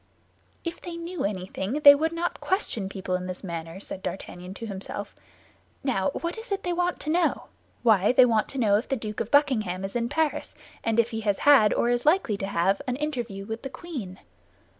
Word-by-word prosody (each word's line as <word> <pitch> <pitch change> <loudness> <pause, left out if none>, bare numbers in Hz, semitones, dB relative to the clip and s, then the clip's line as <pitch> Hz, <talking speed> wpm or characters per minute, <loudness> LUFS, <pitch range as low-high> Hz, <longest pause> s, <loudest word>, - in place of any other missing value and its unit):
"If 335 0 -5
they 345 -1 -6
knew 335 +2 -4
anything, 190 +1 -3
they 285 -1 +11
would 315 +3 0
not 340 +1 -2
question 230 - -1
people 190 -2 -4
in 180 0 -1
this 185 +2 -6
manner," 165 -1 -6
said 195 -1 -7
D'Artagnan 180 0 -6
to 230 - -6
himself. 200 0 -6 0.7
"Now, 250 -5 +1
what 340 +7 -4
is 450 0 -8
it 395 - -1
they 355 - -1
want 355 0 0
to 305 - -2
know? 340 0 +1 0.3
Why, 210 -4 +5
they 255 0 +7
want 225 -3 +2
to 275 - -6
know 205 -4 +4
if 235 - -7
the 270 - +1
Duke 215 -3 -5
of 225 - -2
Buckingham 215 -10 +2
is 195 - -7
in 235 0 0
Paris, 315 0 -1 0.3
and 225 0 +1
if 230 +1 +3
he 225 -1 -3
has 205 -2 +1
had, 270 -8 +6
or 240 - +2
is 245 0 +1
likely 305 - +3
to 195 - -3
have, 195 +3 +1
an 250 - 0
interview 240 -9 -3
with 225 +2 -5
the 270 - -5
queen." 255 - -7
230 Hz, 210 wpm, -26 LUFS, 195-300 Hz, 0.7 s, they